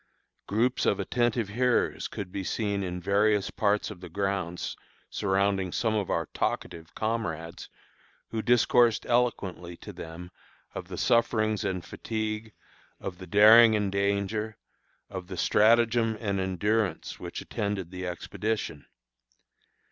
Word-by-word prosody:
Groups 120 +5 +1
of - - +2
attentive 120 -3 0
hearers 125 +3 +1
could 95 -3 -6
be 95 - -4
seen 100 0 -1
in 90 -2 -3
various 100 +2 +2
parts 105 0 +1
of 90 -4 -11
the 90 - -8
grounds 95 -1 -2 0.4
surrounding 95 -1 +1
some 110 +3 0
of 105 -3 -1
our 85 - 0
talkative 80 -1 -3
comrades 90 -7 -3 0.6
who 110 - -2
discoursed 120 -1 +4
eloquently 95 -8 -1
to - - -10
them 85 +2 -9 0.4
of - - -6
the - - -7
sufferings 110 -3 +2
and 90 -3 -2
fatigue, 110 0 -4 0.5
of 90 -2 -6
the 95 - -9
daring 110 +4 +8
and 105 -2 0
danger, 100 +2 -1 0.5
of 95 -2 -7
the 95 -1 -7
stratagem 115 +2 +3
and 100 -3 -1
endurance 100 +3 -1
which - - -6
attended 100 -4 -3
the 90 0 -5
expedition. 90 -2 -3
100 Hz, 130 wpm, -28 LUFS, 95-110 Hz, 0.6 s, daring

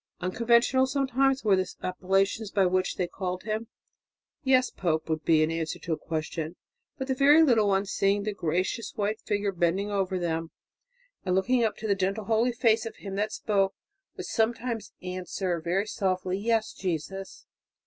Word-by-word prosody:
Unconventional 235 +6 +3
sometimes 270 0 +1
were 205 -3 +4
the 185 -1 -1
appellations 195 +3 0
by 200 -1 +2
which 185 0 +1
they 180 - 0
called 180 0 -4
him. 220 +2 -3 0.8
"Yes, 260 -2 +3
Pope," 160 -4 -1
would 160 -1 -2
be 155 -1 +4
the 165 +1 -2
answer 160 -1 -3
to 170 - -3
a - - +1
question. 160 +1 -4 0.4
But 265 - -3
the 265 - +1
very 290 +4 +6
little 230 -8 +4
ones, 195 0 +1
seeing 200 +1 +2
the 210 0 -2
gracious 185 +6 -2
white 210 +1 -1
figure 205 -1 -1
bending 185 +3 0
over 190 -2 0
them 165 -2 -2 0.7
and 185 -1 0
looking 235 +6 +2
up 220 - +1
into 220 - -5
the 200 - +3
gentle 195 +2 -1
holy 230 +3 +2
face 225 -2 +2
of - - -8
him 195 -2 -8
that 210 +1 0
spoke, 195 -3 0 0.4
would - - -5
sometimes 230 -1 -1
answer 180 0 -2
softly, 185 -2 -1
"Yes, 225 +1 0
Jesus." 190 +2 -5
195 Hz, 170 wpm, -27 LUFS, 180-225 Hz, 0.8 s, very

